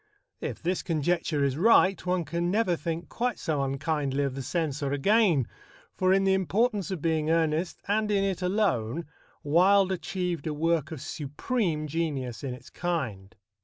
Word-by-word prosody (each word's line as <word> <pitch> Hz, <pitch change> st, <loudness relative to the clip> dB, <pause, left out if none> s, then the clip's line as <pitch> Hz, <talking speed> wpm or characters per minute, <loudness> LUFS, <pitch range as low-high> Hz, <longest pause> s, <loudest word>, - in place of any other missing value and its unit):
If -, -, -5 dB
this 180 Hz, +2 st, 0 dB
conjecture 160 Hz, -2 st, 0 dB
is 140 Hz, -1 st, 0 dB
right, 195 Hz, -2 st, +5 dB
one 180 Hz, -2 st, +1 dB
can 170 Hz, +3 st, -1 dB
never 195 Hz, -2 st, +2 dB
think 165 Hz, +1 st, -4 dB
quite 245 Hz, +4 st, -2 dB
so 150 Hz, -3 st, -1 dB
unkindly 140 Hz, 0 st, -1 dB
of 140 Hz, -2 st, -1 dB
the 135 Hz, -, -5 dB
Censor 145 Hz, -1 st, -2 dB
again, 170 Hz, -, +3 dB, 0.5 s
for 185 Hz, 0 st, +2 dB
in 195 Hz, +1 st, +4 dB
The 195 Hz, 0 st, +3 dB
Importance 200 Hz, +1 st, +1 dB
of 185 Hz, -6 st, -4 dB
Being 160 Hz, -2 st, +1 dB
Earnest, 165 Hz, +1 st, +1 dB
and 210 Hz, +1 st, +1 dB
in 200 Hz, -1 st, +2 dB
it 190 Hz, -2 st, -1 dB
alone, 170 Hz, -, 0 dB, 0.4 s
Wilde 190 Hz, +6 st, +4 dB
achieved 180 Hz, -4 st, -3 dB
a 150 Hz, -, -2 dB
work 160 Hz, -1 st, 0 dB
of 155 Hz, -5 st, -6 dB
supreme 155 Hz, -, -2 dB
genius 145 Hz, -6 st, -3 dB
in 130 Hz, -3 st, -3 dB
its 125 Hz, -, -15 dB
kind. 115 Hz, -, -3 dB
165 Hz, 165 wpm, -28 LUFS, 145-190 Hz, 0.5 s, right